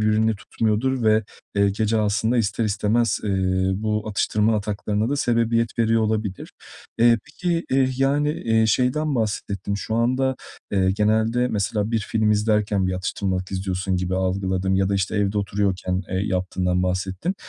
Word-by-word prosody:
birbirini 110 +1 +2
tutmuyordur 115 +6 -1
ve, 110 0 +4 0.3
eee, 100 -1 +3
gece 110 +2 0
aslında 110 +3 +1
ister 110 0 0
istemez, 105 +1 +1
eee, 105 - -1 0.4
bu 105 +1 -2
atıştırma 105 +1 +1
ataklarına 105 +1 -2
da 145 - 0
sebebiyet 115 -3 +1
veriyor 115 0 +3
olabilir. 105 -3 -2 0.5
Eee, 115 0 +5
peki, 170 +1 -2
eee, 130 0 +3
yani, 145 +2 +2
eee, 115 -6 +1
şeyden 130 +7 +1
bahsettin. 100 -3 -2
Şu 105 +2 -3
anda, 130 +3 +1 0.4
eee, 95 -2 +2
genelde 110 +4 +1
mesela 105 +1 -1
bir 115 - +1
film 110 +1 0
izlerken 105 -2 +1
bir 95 - -1
atıştırmalık 95 0 -3
istiyorsun 95 0 -2
gibi 90 0 -2
algıladım 95 0 0
ya 95 0 +2
da, 100 - 0
işte, 95 +2 -1
evde 105 0 +1
oturuyorken, 95 -2 -1
eee, 95 - -1
yaptığından 90 -1 0
bahsettin. 95 - -2
105 Hz, 150 wpm, -23 LUFS, 95-115 Hz, 0.5 s, Eee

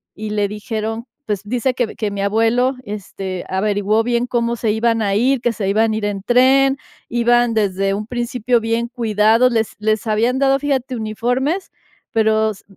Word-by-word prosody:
Y 215 0 -5
le 205 -1 +1
dijeron, 220 +2 -4 0.2
pues, 205 -3 -2
dice 250 +3 0
que 245 -4 -2
que 210 -2 -2
mi 200 -1 -4
abuelo, 225 +5 +2
este, 190 -3 -6
averiguó 205 +3 +1
bien 240 +1 0
cómo 235 -1 0
se 220 -2 0
iban 225 0 +1
a 200 -1 0
ir, 260 +4 +2
que 240 -2 0
se 195 -3 -2
iban 220 +2 +2
a - - -1
ir 215 - -4
en 200 -2 -3
tren, 265 +3 +4 0.3
iban, 240 0 +2
desde 195 -2 0
un 210 +1 -3
principio, 240 0 0
bien 230 +1 -1
cuidados, 225 +1 +3
les 225 -1 -1
les 215 +1 0
habían 230 +5 +1
dado, 275 0 +3
fíjate, 265 -3 -1
uniformes, 245 - -2 0.4
pero 220 -1 +2
s 205 - -13
225 Hz, 180 wpm, -19 LUFS, 210-245 Hz, 0.4 s, tren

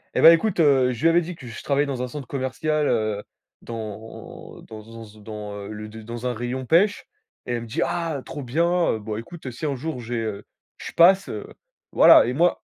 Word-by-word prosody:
Eh - - +2
ben 165 - +10
écoute, 175 +3 +2
heu, 135 -4 +4
je 120 - -8
lui 165 - +5
avais 170 +1 +4
dit 175 +1 -6
que 135 -6 -12
je 115 - -9
travaillais 140 0 +1
dans 135 -3 -4
un 125 - -2
centre 135 0 -8
commercial, 145 +3 -1
heu, 110 -3 0 0.4
dans 110 -1 -9
dans 115 +1 -11
z 110 -1 -15
dans, 105 -1 -7
heu, 100 -1 -7
le 105 0 -7
dans 115 +2 -8
un 125 - -1
rayon 120 +3 -4
pêche 185 - +3 0.4
et 120 - -3
elle 120 - -2
me 115 - -8
dit: 140 +10 -3
«Ah, 165 -5 -2
trop 145 - -7
bien, 170 +7 +1
heu, 110 - -3
bon 105 0 -5
écoute, 130 +4 -8
si 120 +6 -6
un 145 -2 -1
jour 150 +1 -5
j'ai 120 0 -5
heu, 105 -2 -5 0.3
je - - -8
passe», 190 +3 +5
heu, - - -5 0.5
voilà. - - +7
Et 125 - -1
moi, 170 +6 +1
125 Hz, 220 wpm, -23 LUFS, 110-160 Hz, 0.5 s, ben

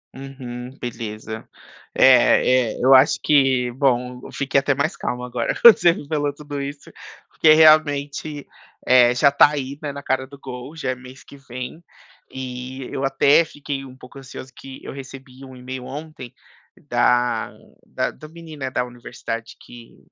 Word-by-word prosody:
Uhum, 130 -2 -8
beleza, 110 -2 -7 0.5
é 130 -1 +4
é, - - -10
eu 135 +1 +7
acho 130 +2 +4
que, 135 -4 +2
bom, 125 -2 0
eu - - -10
fiquei 140 0 0
até 140 +1 0
mais 140 +6 -1
calmo 125 0 -4
agora 125 -1 -2
quando 235 -2 +9
você 175 - +4
me 150 - -10
falou 145 -2 -1
tudo 145 -1 -7
isso, 140 +1 -7 0.4
porque 155 - +4
realmente, 150 -1 +3 0.4
eh, 125 -1 +6
já 125 +3 +4
tá 140 +1 +6
aí, 140 -2 -5
né, 150 -2 -4
na 140 0 -8
cara 130 -1 -1
do 140 +1 -15
gol, 130 +2 -9
já 140 -5 -2
é - - -4
mês 130 +1 -14
que - - -15
vem, 130 +4 -9 0.5
e 130 0 -7
eu 135 - -4
até 135 +4 +4
fiquei 145 -3 -6
um 130 -1 -13
pouco 130 +1 -14
ansioso, 130 -1 -10
que 135 -1 -11
eu - - -8
recebi 135 -1 -11
um 130 -1 -12
email 125 0 -8
ontem 145 -1 -9 0.6
da, 120 0 +1 0.3
da - - -3
da 155 - -13
menina 155 -5 -8
da 125 - -1
universidade 120 -2 -8
que 120 -1 -15
135 Hz, 165 wpm, -21 LUFS, 125-145 Hz, 0.6 s, quando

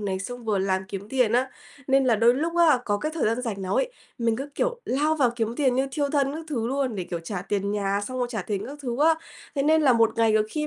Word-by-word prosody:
này, 195 -2 -2
xong 245 +5 -7
vừa 210 -3 +1
làm 190 0 0
kiếm 200 +1 -6
tiền 250 -3 +2
á, 255 +2 +2 0.4
nên 270 0 +3
là 240 -3 +3
đôi 230 +3 +5
lúc 330 +5 -2
á 325 -6 +5
có 205 - +1
cái 310 +5 -3
thời 330 - 0
gian 230 +3 0
rảnh 210 -5 -4
nào 185 - -2
ấy, - - +1 0.3
mình 230 -1 +1
cứ, 275 +3 -5
kiểu, 485 -1 -1
lao 300 +4 +1
vào 260 -5 +3
kiếm 225 0 -1
tiền 265 -4 +2
như 265 +2 +1
thiêu 285 0 0
thân 280 -2 +2
các 320 - -6
thứ 235 -7 -2
luôn, 265 -1 -1
để, 185 -3 -3
kiểu, 170 -1 -4
trả 180 +2 -5
tiền 200 0 -2
nhà, 200 -1 0
xong 255 0 -5
rồi 245 - 0
trả 220 -5 -3
tiền 200 0 -3
các 285 +2 -8
thứ 240 -3 -3
á. 320 +2 +5 0.4
Thế 275 - 0
nên 315 +2 +4
là 270 -4 +5
một 230 -1 +4
ngày 225 -1 +3
có 215 - +4
khi 305 -1 -2
245 Hz, 285 wpm, -25 LUFS, 210-280 Hz, 0.4 s, đôi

